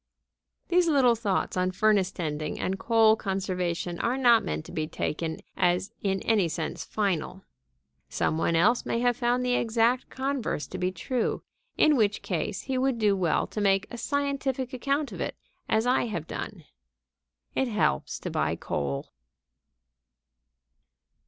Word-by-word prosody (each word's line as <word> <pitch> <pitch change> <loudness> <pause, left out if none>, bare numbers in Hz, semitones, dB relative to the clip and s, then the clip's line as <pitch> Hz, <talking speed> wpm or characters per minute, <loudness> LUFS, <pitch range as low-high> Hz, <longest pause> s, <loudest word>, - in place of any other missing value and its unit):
These 355 0 +4
little 270 -6 +5
thoughts 215 -4 -1
on 185 0 +1
furnace 195 0 +2
tending 155 -5 -3
and 190 +1 -2
coal 225 -2 +5
conservation 180 -4 -2
are 245 +2 0
not 240 -4 +5
meant 75 0 -3
to - - -10
be 155 -1 -2
taken 160 0 -3
as 180 +1 +1
in 195 -1 -1
any 210 -6 +3
sense 160 0 -4
final. 190 -2 -2 0.7
Some 160 - 0
one 165 - +1
else 215 +9 +4
may - - -1
have 245 -1 +3
found 245 +1 +1
the 250 - +1
exact 235 +1 +2
converse 265 - -2
to 185 - -6
be 180 0 0
true; 235 +7 -2 0.3
in 305 -1 +5
which 210 -4 +1
case 190 +2 -2
he 260 -1 -2
would 265 -2 +1
do 210 -3 +3
well 180 -4 +1
to 210 - -5
make 195 0 +3
a 240 - -6
scientific 275 -2 -1
account 280 +3 -1
of - - -6
it - - -3 0.3
as 220 +1 +2
I 250 -1 +2
have 175 -8 -4
done. - - -6 0.9
It 265 - +1
helps 210 - 0
to - - -4
buy - - 0
coal. 70 -2 -3
210 Hz, 155 wpm, -27 LUFS, 180-245 Hz, 0.9 s, little